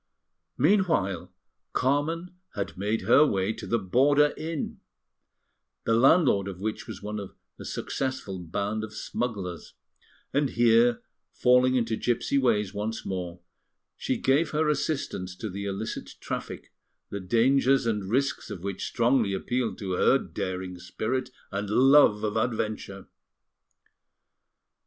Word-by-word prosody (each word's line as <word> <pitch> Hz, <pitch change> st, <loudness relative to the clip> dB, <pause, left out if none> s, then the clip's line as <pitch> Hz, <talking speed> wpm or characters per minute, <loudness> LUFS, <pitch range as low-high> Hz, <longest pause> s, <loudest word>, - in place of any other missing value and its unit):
Meanwhile 140 Hz, -, +2 dB, 0.4 s
Carmen 160 Hz, +7 st, 0 dB, 0.2 s
had 100 Hz, -, -3 dB
made 105 Hz, +4 st, -1 dB
her 145 Hz, -, +6 dB
way 100 Hz, -6 st, +1 dB
to -, -, -8 dB
the 115 Hz, -, +2 dB
border 140 Hz, +9 st, +3 dB
inn, 160 Hz, -1 st, -4 dB, 1.0 s
the 115 Hz, -, +1 dB
landlord 125 Hz, -, +4 dB
of 95 Hz, -2 st, -6 dB
which 110 Hz, +4 st, -4 dB
was 100 Hz, -4 st, -8 dB
one 105 Hz, 0 st, -4 dB
of 100 Hz, -2 st, -8 dB, 0.2 s
a -, -, -8 dB
successful 130 Hz, -8 st, -3 dB
band 100 Hz, +5 st, -3 dB
of 110 Hz, -1 st, -7 dB
smugglers; 100 Hz, -8 st, -4 dB, 0.6 s
and 140 Hz, 0 st, +2 dB
here, 120 Hz, 0 st, +4 dB, 0.3 s
falling 125 Hz, +1 st, +4 dB
into 115 Hz, -2 st, +1 dB
gipsy 120 Hz, +4 st, 0 dB
ways 105 Hz, -6 st, +1 dB
once 105 Hz, +2 st, -4 dB
more, 90 Hz, -2 st, -4 dB, 0.5 s
she -, -, -2 dB
gave 145 Hz, +5 st, +2 dB
her 155 Hz, 0 st, +1 dB
assistance 140 Hz, -11 st, -2 dB
to 110 Hz, +1 st, -5 dB
the 100 Hz, +2 st, -5 dB
illicit 100 Hz, +3 st, -5 dB
traffic, -, -, -6 dB, 0.4 s
the 100 Hz, -, -3 dB
dangers 130 Hz, +7 st, +3 dB
and 105 Hz, -4 st, -1 dB
risks 135 Hz, +5 st, 0 dB
of 85 Hz, -, -7 dB
which 100 Hz, -1 st, -3 dB
strongly 120 Hz, -4 st, +2 dB
appealed 115 Hz, 0 st, -2 dB
to 95 Hz, -3 st, -5 dB
her 90 Hz, -, +4 dB
daring 90 Hz, -1 st, -5 dB
spirit 125 Hz, +8 st, -3 dB, 0.2 s
and 100 Hz, 0 st, -3 dB
love 130 Hz, -2 st, +5 dB
of 105 Hz, 0 st, -1 dB
adventure. 110 Hz, -4 st, -2 dB
110 Hz, 130 wpm, -27 LUFS, 100-130 Hz, 1.0 s, her